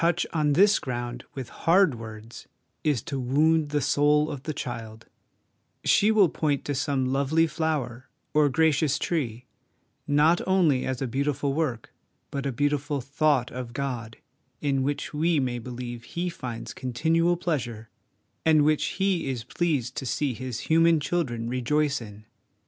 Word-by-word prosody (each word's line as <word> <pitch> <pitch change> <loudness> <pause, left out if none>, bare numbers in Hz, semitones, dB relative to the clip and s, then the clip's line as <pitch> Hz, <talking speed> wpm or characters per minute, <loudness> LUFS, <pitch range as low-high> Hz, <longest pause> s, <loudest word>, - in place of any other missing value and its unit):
SO 165 - +4
HOME - - +5
EDUCATION 175 0 -1
on 150 -1 +2
this 200 +6 +5
ground 120 -3 -4
with 130 -3 -6
hard 175 -2 +3
words 115 0 -10 0.4
is 145 -8 +1
to 140 - -4
wound 150 +5 +2
the 145 0 0
soul 150 +2 +3
of 140 - -6
the 155 - -4
child): 115 -5 -6 0.8
she 210 - +4
will 215 -4 +5
point 145 -3 -1
to 145 - -1
some 130 -1 0
lovely 140 +4 +2
flower 150 -6 -3 0.2
or 150 -1 +4
gracious 155 0 +2
tree, 125 -8 -2 0.6
not 150 +4 +4
only 170 -9 +3
as 130 0 -2
a - - -1
beautiful 140 +2 -1
work, 140 -7 -2 0.4
but 140 0 -3
a - - -1
beautiful 145 +2 0
thought 140 -1 +1
of 125 -1 -6
God, 120 -4 -4 0.4
in 140 -2 0
which 145 +3 -2
we 160 +1 +2
may 125 -2 -1
believe 120 0 -8
Me 175 +1 -1
finds 125 -8 -6
continual 165 +7 +1
pleasure, 120 -10 -3 0.6
and 155 -2 +4
which 155 0 +1
He 190 -7 +1
is 125 -3 -3
pleased 130 -3 -1
to 135 - -3
see 140 +2 0
his 125 0 -5
human 165 0 +4
children 145 -8 -2
rejoice 140 +4 0
in. 105 -1 -11
140 Hz, 160 wpm, -26 LUFS, 125-155 Hz, 0.8 s, HOME